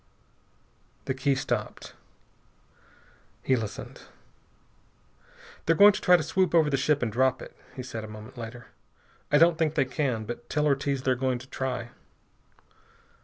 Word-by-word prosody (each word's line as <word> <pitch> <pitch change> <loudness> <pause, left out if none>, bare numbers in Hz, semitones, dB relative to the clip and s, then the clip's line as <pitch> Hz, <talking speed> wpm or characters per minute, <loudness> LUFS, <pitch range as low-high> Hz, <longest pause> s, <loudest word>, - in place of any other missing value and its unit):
The - - -1
key 135 +1 +1
stopped. - - -4 1.5
He 130 - +3
listened. 110 -4 -6 1.7
"They're 165 - +4
going 205 +4 +8
to - - -5
try 180 0 +6
to 160 - -3
swoop 185 +2 +1
over 155 -3 +4
the - - +2
ship 145 +1 +1
and 115 - -1
drop 130 +3 +2
it," - - -11 0.2
he 130 - -6
said 115 -3 -6
a - - -7
moment 110 +4 -11
later. 120 -1 -9 0.6
"I 150 - +6
don't 165 +1 +4
think 160 -2 +1
they - - +2
can. 130 -5 -2
But 120 +2 -7
tell 150 0 0
Ortiz 140 -2 0
they're 130 - +2
going 130 0 -1
to 125 +2 -12
try." 130 -3 -4
130 Hz, 155 wpm, -27 LUFS, 120-150 Hz, 1.7 s, going